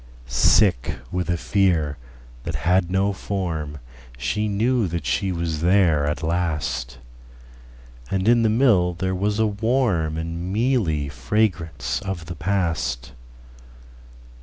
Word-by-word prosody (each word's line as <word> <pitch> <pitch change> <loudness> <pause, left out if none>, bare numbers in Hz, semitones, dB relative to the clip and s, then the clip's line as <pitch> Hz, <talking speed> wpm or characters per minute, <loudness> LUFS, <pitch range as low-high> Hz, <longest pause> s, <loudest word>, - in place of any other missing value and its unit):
Sick 65 - +3 0.2
with 90 -1 -2
a 85 - +1
fear 85 -7 +1 0.4
that - - -4
had 90 0 +3
no 95 +2 +1
formShe 75 - -4
knew 115 +2 +1
that 85 -3 -4
she 95 +10 0
was 85 -3 -2
there 85 -5 +3
at 75 +1 -2
last; 80 -7 -2 1.1
And 95 +1 -1
in 120 0 +5
the 110 - +3
mill 105 -7 +3
there 95 +1 -2
was 100 +3 0
a 110 - +3
warmAnd 95 -8 0
mealy 105 - +1
fragrance 70 - -1
of 95 -4 -5
the 85 +1 -7
past. 80 -8 -1
90 Hz, 115 wpm, -23 LUFS, 75-100 Hz, 1.1 s, in